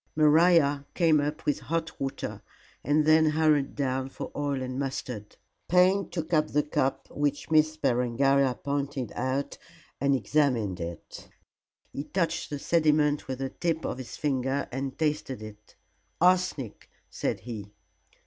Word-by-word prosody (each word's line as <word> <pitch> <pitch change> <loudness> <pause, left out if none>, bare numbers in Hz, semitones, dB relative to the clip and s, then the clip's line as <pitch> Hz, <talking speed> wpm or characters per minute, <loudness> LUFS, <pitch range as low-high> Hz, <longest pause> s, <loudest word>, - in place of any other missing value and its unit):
Maria 155 -2 +4
came 165 -4 +4
up 145 +1 -3
with 145 - +1
hot 165 0 -3
water 135 0 -4 0.4
and 150 +1 +2
then 155 +1 +6
hurried 155 -2 +2
down 135 -1 -1
for - - -7
oil 145 -2 -1
and 130 0 -4
mustard. 125 -6 -5 0.3
Payne 185 +3 +4
took 165 -1 -4
up 155 -1 +3
the 150 0 +1
cup 135 -2 -1
which 145 +1 -2
Miss 155 0 +4
Berengaria 130 +1 +2
pointed 140 -3 -3
out 135 +2 -2 0.4
and 140 0 +3
examined 120 -6 +1
it. 85 -1 -8 0.6
He 140 - -4
touched 170 -2 -1
the 145 - -3
sediment 150 -1 +2
with 130 -1 -3
the 135 0 -3
tip 165 0 -2
of 125 - -3
his 130 - -8
finger 135 -1 -1
and 135 +2 -4
tasted 150 -6 -2
it. 105 -1 -12 0.4
"Arsenic," 180 - +1 0.2
said - - -2
he. 110 -4 -7
145 Hz, 140 wpm, -28 LUFS, 130-155 Hz, 0.6 s, then